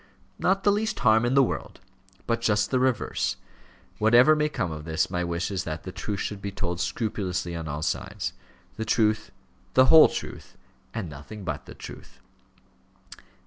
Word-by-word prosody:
"Not 195 +1 +2
the 205 - +5
least 215 +1 -1
harm 110 -1 +4
in 125 +3 +1
the 140 - +7
world, - - -4 0.5
but 115 0 0
just 105 -3 +1
the 130 - +2
reverse. 130 -2 0 0.6
Whatever 120 +7 +6
may 150 0 +1
come 90 - -2
of 75 -1 -6
this, 80 0 -1
my 90 0 -1
wish 85 +2 -2
is 95 -1 -2
that 80 -1 -5
the 95 - -6
truth 100 +1 -4
should 105 -2 -4
be 100 - -3
told 90 -3 -3
scrupulously 90 -6 -2
on 80 -1 -5
all 75 +1 -4
sides; - - -3 0.4
the 110 - -2
truth, 110 -1 +1 0.5
the 130 - +7
whole 160 - +10
truth, - - -7 0.3
and 110 -6 -4
nothing 80 +8 -9
but - - -5
the - - -10
truth." - - -11
105 Hz, 175 wpm, -26 LUFS, 85-125 Hz, 0.6 s, whole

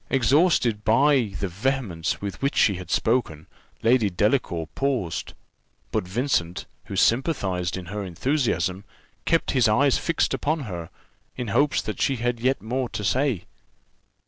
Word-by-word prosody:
Exhausted 130 - +3
by 120 -2 +3
the 100 - -1
vehemence 100 -3 -2
with 100 -1 -5
which 140 +1 0
she 100 - +4
had 90 -1 -8
spoken, 110 -10 0 0.4
Lady 115 -2 +4
Delacour 90 -3 0
paused; 130 -12 -2 0.6
but 90 - -1
Vincent, 90 -5 -1 0.2
who - - -6
sympathized 100 - +1
in 95 - -7
her 100 +4 -5
enthusiasm, 95 - -1 0.4
kept 165 0 +2
his 130 -5 +3
eyes 135 +6 +3
fixed 165 - 0
upon 155 +1 -1
her, 90 -9 -6 0.5
in 125 -4 -4
hopes 140 +7 +2
that - - -5
she 135 - +2
had 120 0 -1
yet 130 +1 0
more 125 +2 -2
to 105 - -5
say. 125 -2 0
115 Hz, 145 wpm, -24 LUFS, 95-135 Hz, 0.6 s, she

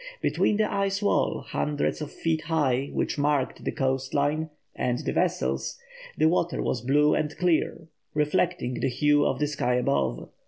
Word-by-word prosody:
Between 210 - +1
the 215 - +3
ice 200 -1 0
wall, 205 -1 +1
hundreds 150 +1 -1
of 150 - -5
feet 160 -1 -1
high, 145 -5 +1
which - - -1
marked 145 -2 0
the - - -1
coast 135 0 -1
line, 150 +3 +1 0.3
and 125 -1 0
the - - -3
vessels, - - 0 0.4
the 155 - +4
water 170 +1 +1
was 120 - -1
blue 145 +4 +3
and 150 -1 -1
clear, 170 -2 0 0.3
reflecting 150 -3 0
the - - +1
hue 145 +3 +3
of - - +1
the 150 - +1
sky 140 -4 0
above. 70 - 0
150 Hz, 165 wpm, -26 LUFS, 130-160 Hz, 0.4 s, the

